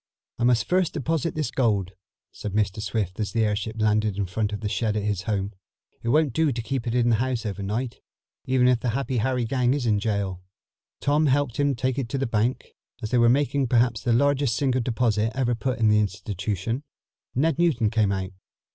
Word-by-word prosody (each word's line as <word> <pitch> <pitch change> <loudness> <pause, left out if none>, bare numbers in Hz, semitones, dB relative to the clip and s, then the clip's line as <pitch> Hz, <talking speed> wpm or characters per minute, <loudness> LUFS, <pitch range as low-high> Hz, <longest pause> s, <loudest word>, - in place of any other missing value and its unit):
"I 120 - +2
must 120 -1 +3
first 185 -2 +2
deposit 160 +2 -1
this 150 -5 -1
gold," 105 -8 +1 0.4
said 105 - -6
Mr. 105 0 0
Swift 105 -4 -2
as 105 - -2
the 115 -1 +2
airship 105 +1 -2
landed 105 -2 +1
in 100 - 0
front 105 +4 -2
of 105 - -4
the 105 - -2
shed 105 0 0
at 105 - -1
his 105 -3 -1
home. 100 0 -1 0.5
"It 115 - -3
won't 150 0 +3
do 160 +2 +2
to 120 -2 -3
keep 120 +1 -3
it 115 - -1
in 120 -1 +3
the 115 - +3
house 125 -1 -1
over 100 -1 -4
night, 115 +5 -3 0.4
even 130 -1 +3
if 125 -2 +4
the 125 - -1
Happy 135 -2 -2
Harry 125 +1 0
gang 125 +1 +1
is 140 -4 -2
in 105 -3 +2
jail." 100 -4 -2 0.6
Tom 150 +2 +2
helped 140 -3 +1
him 145 -1 +2
take 130 +2 -1
it 125 -4 -3
to 135 - -2
the 135 - 0
bank. 115 +2 -1 0.3
As 110 - -3
they 125 - +3
were 120 0 +5
making 140 +1 +2
perhaps 120 -1 +2
the 120 - 0
largest 140 0 +2
single 130 -2 +1
deposit 115 -2 0
ever 125 -2 +1
put 125 +3 -2
in 110 -2 +3
the 105 0 +4
institution, 105 +3 -2 0.5
Ned 155 +4 +1
Newton 130 -11 +2
came 110 -3 +2
out. 95 -1 -2
115 Hz, 215 wpm, -25 LUFS, 105-130 Hz, 0.6 s, were